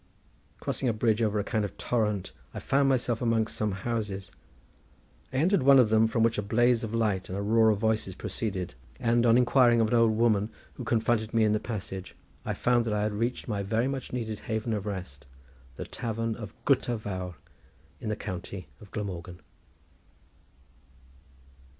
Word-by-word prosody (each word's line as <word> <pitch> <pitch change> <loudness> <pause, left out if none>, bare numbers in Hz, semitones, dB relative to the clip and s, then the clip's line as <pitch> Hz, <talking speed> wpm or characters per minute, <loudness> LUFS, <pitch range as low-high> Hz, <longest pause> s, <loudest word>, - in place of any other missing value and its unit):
Crossing 130 - -1
a - - +1
bridge 110 0 +1
over 110 -1 +1
a - - 0
kind 110 0 -1
of 100 - -5
torrent, 105 -5 -1 0.2
I - - -3
found 140 0 +2
myself 120 -3 +1
amongst 115 -2 +1
some 105 -2 -1
houses. 105 -5 -3 1.0
I - - -8
entered 175 +7 +3
one 135 +1 +7
of 125 -4 +5
them 110 0 +5
from 110 0 +1
which 115 -2 +2
a - - +1
blaze 120 +3 +2
of 110 - -4
light 110 -5 0
and 95 - -3
a - - -2
roar 110 +1 +4
of 105 - +3
voices 110 -3 0
proceeded, 95 -5 -3 0.3
and, 120 +1 +3
on 115 +1 +6
inquiring 125 -1 +5
of 110 -1 +3
an - - -1
old 115 -2 +4
woman 110 -2 +3 0.2
who 125 - -7
confronted 115 -1 +1
me 115 - +4
in 105 - +3
the 105 - +2
passage, 95 -5 -6 0.3
I - - -2
found 120 -1 +2
that 110 -2 0
I 105 - 0
had 105 0 -1
reached 115 +4 -2
my 105 -4 -1 0.2
much 135 -1 -3
needed 110 -4 -3
haven 110 +1 -2
of 105 -1 -3
rest, 90 -8 -6 0.5
the - - -6
tavern 115 0 -3
of 105 -3 -8
Gutter 125 -3 +2
Vawr 95 -4 -5 0.6
in - - -4
the 105 - 0
county 95 -4 -6
of 105 - -14
Glamorgan. 90 -4 -5
110 Hz, 180 wpm, -28 LUFS, 105-120 Hz, 1.0 s, one